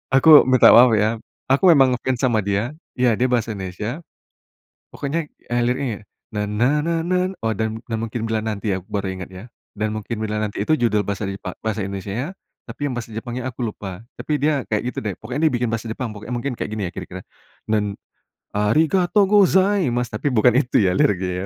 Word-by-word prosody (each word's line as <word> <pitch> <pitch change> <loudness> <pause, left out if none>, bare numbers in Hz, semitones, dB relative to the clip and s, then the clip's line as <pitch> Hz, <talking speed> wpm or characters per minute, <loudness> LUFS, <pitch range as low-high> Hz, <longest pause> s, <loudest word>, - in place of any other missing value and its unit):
Aku 150 +3 +8
minta 130 -1 +6
maaf, 125 +1 +8
ya. 110 +2 0 0.2
Aku 140 +8 +4
emang 135 -5 +5
nge-fans 125 +1 -2
sama 120 -4 +1
dia. 100 +7 -1 0.2
Ya, 125 -2 +3
dia 125 +3 0
bahasa 115 -3 0
Indonesia, 105 - -5 0.9
pokoknya, 150 +2 -3 0.2
eee, 120 - +2
liriknya, 125 -2 -1 0.4
"na 105 0 -1
na 120 +8 +1
na 165 0 -1
nan" 185 +2 0
oh, 110 - +1
Dan 110 +2 -2
Dan 115 -1 -3
Mungkin 115 0 -4
Bila 110 -1 -1
Nanti, 110 -1 -2
ya, 95 - -2
aku 95 - -23
baru 100 -2 -2
inget, 90 - -6
ya. 95 +2 -11 0.3
Dan 105 +1 -1
Mungkin 110 +2 -4
Bila 105 0 -2
Nanti, 105 -1 -2
itu 155 - +1
judul 105 -3 +2
bahasa 100 0 -3
Jepa 95 -1 -6
bahasa 110 -2 -2
Indonesianya, 100 - -4 0.3
tapi 145 - -4
yang 125 - -5
bahasa 115 -2 -6
Jepangnya 120 +2 -5
aku 125 - -14
lupa. 95 -3 -7 0.2
Tapi - - -5
dia 145 -3 +1
kayak, 105 -1 -1
gitu, 125 - -6
deh. 105 - -1
Pokoknya 130 +4 -4
dia 155 - +2
biikin 120 -1 0
bahasa 115 0 -3
Jepang 125 +1 -4
pokoknya. 110 +4 -8
Mungkin 125 +3 -2
kayak - - -4
gini, 105 -4 -2
ya, - - -8
kira-kira. 95 0 -7 0.5
Dan 105 -2 -1 0.5
arigatou 160 - +2
gozaimasu," 190 - +3
tapi 140 +4 -1
bukan 120 +1 +4
itu, 130 -3 +2
ya, 95 -3 +3
liriknya, 95 -2 +1
115 Hz, 200 wpm, -21 LUFS, 105-135 Hz, 0.9 s, Aku